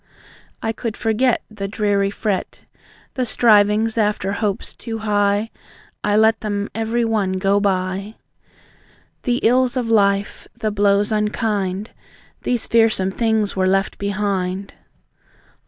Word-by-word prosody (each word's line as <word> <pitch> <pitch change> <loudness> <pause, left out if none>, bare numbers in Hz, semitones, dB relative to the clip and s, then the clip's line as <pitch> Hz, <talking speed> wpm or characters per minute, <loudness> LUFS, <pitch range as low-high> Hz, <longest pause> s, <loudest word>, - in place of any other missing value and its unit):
I 225 - 0
could 225 0 -5
forget 230 +2 +1
The 200 -2 -5
dreary 200 -1 0
fret. 200 -2 -3 0.5
The 255 - -1
strivings 220 -1 +3
after 210 -2 0
hopes 200 -1 -2
too 225 -2 -6
high, 205 0 +1 0.5
I 205 0 +2
let 220 +1 +4
them 205 -1 -3
every 225 +1 0
one 210 -4 0
go 195 +2 +2
by. 195 +1 -1 1.1
The 245 -2 0
ills 255 +2 +3
of 235 -2 -1
life, 200 -2 +1
the 215 - -1
blows 205 +1 +2
unkind, 210 -2 -1 0.5
These 245 -2 0
fearsome 225 -5 +2
things 220 -1 0
were 185 -1 +1
left 195 +1 0
behind. 195 -1 -2
210 Hz, 120 wpm, -20 LUFS, 200-225 Hz, 1.1 s, let